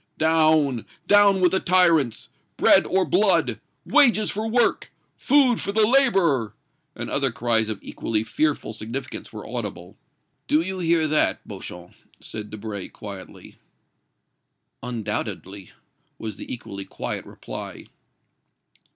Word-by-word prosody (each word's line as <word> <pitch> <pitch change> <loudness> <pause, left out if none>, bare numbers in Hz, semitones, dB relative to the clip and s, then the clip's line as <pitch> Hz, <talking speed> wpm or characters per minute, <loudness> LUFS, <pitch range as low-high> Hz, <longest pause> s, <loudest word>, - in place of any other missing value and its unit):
"Down! 155 -6 +2 0.2
down 200 -1 +5
with 180 - +4
the 190 - +2
tyrants! 170 -10 +3 0.3
Bread - - +5
or 190 0 +1
blood! 185 -3 +3 0.3
Wages 245 -8 +4
for 215 +2 -3
work! 235 +1 +1 0.2
Food 265 -4 +3
for 200 - -3
the 215 +1 +3
laborer!" 190 - +2 0.4
and - - -6
other 135 -2 +1
cries 115 -1 0
of 110 - -3
equally 110 -1 -2
fearful 145 -1 -1
significance 115 +5 -7
were - - -9
audible. - - -6 0.5
"Do 155 - +3
you 190 +2 -5
hear 165 -2 +2
that, 155 0 +1
Beauchamp?" 90 0 -10 0.3
said 105 -1 -8
Debray, 105 -2 -6
quietly. 100 -3 -11 1.2
"Undoubtedly," 100 -5 -5 0.5
was 110 -3 -6
the - - -9
equally 100 -5 -7
quiet - - -5
reply. - - -9
155 Hz, 120 wpm, -23 LUFS, -, 1.2 s, down